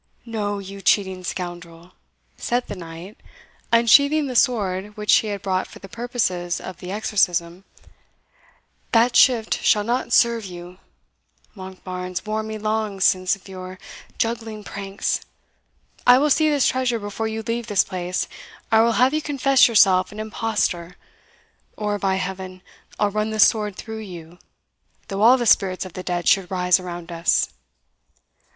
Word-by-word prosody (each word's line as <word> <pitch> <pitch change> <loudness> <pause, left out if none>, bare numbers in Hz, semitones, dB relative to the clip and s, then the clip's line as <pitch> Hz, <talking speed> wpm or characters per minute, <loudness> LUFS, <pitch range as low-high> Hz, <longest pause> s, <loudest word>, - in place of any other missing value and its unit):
"No, 210 -3 -3
you 195 0 -8
cheating 190 -2 +1
scoundrel!" 175 -1 -7 0.4
said 245 +1 -1
the 205 - -6
knight, 170 +3 -10 0.5
unsheathing 280 +6 +5
the 255 -2 -5
sword 210 -5 0
which 210 0 +2
he 220 - -1
had 200 -2 -4
brought 185 -1 -1
for - - -13
the 195 - -11
purposes 220 -7 -2
of 185 -2 -8
the 180 0 -8
exorcism, 185 -4 0 1.3
"that 235 +1 +4
shift 235 -4 +4
shall 210 - +3
not 240 +2 -2
serve 235 -1 +3
you 180 -1 -10 0.8
Monkbarns 185 -1 -6
warned 215 0 -2
me 220 0 -5
long 215 -1 -2
since 185 0 +2
of 195 - -18
your 185 -1 -8 0.4
juggling 225 -2 -3
pranks 195 -1 -3 0.9
I 245 0 +8
will 295 +2 +2
see 310 +2 +4
this 290 -3 +2
treasure 255 -2 0
before 205 +1 -4
you 220 0 -4
leave 230 +1 -3
this 205 -2 +3
place, 180 0 -3 0.5
or 220 - +5
I - - +7
will 230 0 +3
have 255 +5 +3
you 310 - 0
confess 275 -3 +4
yourself 190 -5 +4
an 210 - -9
impostor, 215 -5 -2 0.8
or, 210 -1 -2
by 190 -1 +1
Heaven, 185 0 -5 0.4
I'll 205 -1 +2
run 215 +1 -1
this 215 -2 +5
sword 210 -3 0
through 220 +1 -7
you, 175 -4 -10 0.7
though 195 +1 -3
all 240 +4 +7
the 240 - -2
spirits 195 -5 +2
of 185 - -10
the 185 - -6
dead 175 -2 -3
should 195 -3 +3
rise 180 -1 +2
around 175 -1 -7
us!" 170 0 +1
205 Hz, 155 wpm, -22 LUFS, 185-225 Hz, 1.3 s, I